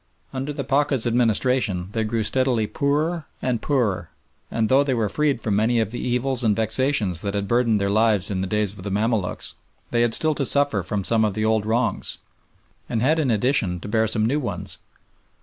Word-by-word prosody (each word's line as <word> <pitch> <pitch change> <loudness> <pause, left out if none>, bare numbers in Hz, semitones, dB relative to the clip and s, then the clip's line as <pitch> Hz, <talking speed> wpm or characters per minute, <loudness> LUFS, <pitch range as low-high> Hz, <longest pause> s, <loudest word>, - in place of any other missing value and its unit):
Under 135 +2 -3
the 140 -1 -4
Pacha's 135 -2 +1
administration 115 -5 +1
they 110 +1 -1
grew 110 +1 -1
steadily 125 -1 +1
poorer 150 +8 -1
and 125 -3 -1
poorer, 110 - 0 0.4
and, 110 -1 0
though 135 +4 +4
they 135 -3 0
were 110 -3 0
freed 145 +1 0
from 105 -2 0
many 115 +3 +2
of 110 -2 -1
the 120 - -4
evils 125 +1 -1
and 105 -3 +3
vexations 110 - +1
that 100 -1 -3
had 100 0 -2
burthened 120 -2 +2
their 100 - 0
lives 105 -2 +2
in 95 -2 -1
the 95 - -2
days 105 0 0
of 95 - -9
the 100 - -4
Mamaluks, 105 -1 -1 0.4
they 120 - +2
had 120 -1 +3
still 155 -1 +1
to 145 - -2
suffer 140 -6 +2
from 100 +2 -3
some 110 +3 +2
of 105 -3 0
the 110 - 0
old 110 -1 +1
wrongs, 115 +2 0 0.7
and 115 - -1
had, 155 +5 +3
in 145 -5 +1
addition, 110 -5 +1
to - - -7
bear 110 +1 +1
some 110 0 +1
new 140 +6 +1
ones. 100 -7 -4
115 Hz, 205 wpm, -23 LUFS, 105-130 Hz, 0.7 s, though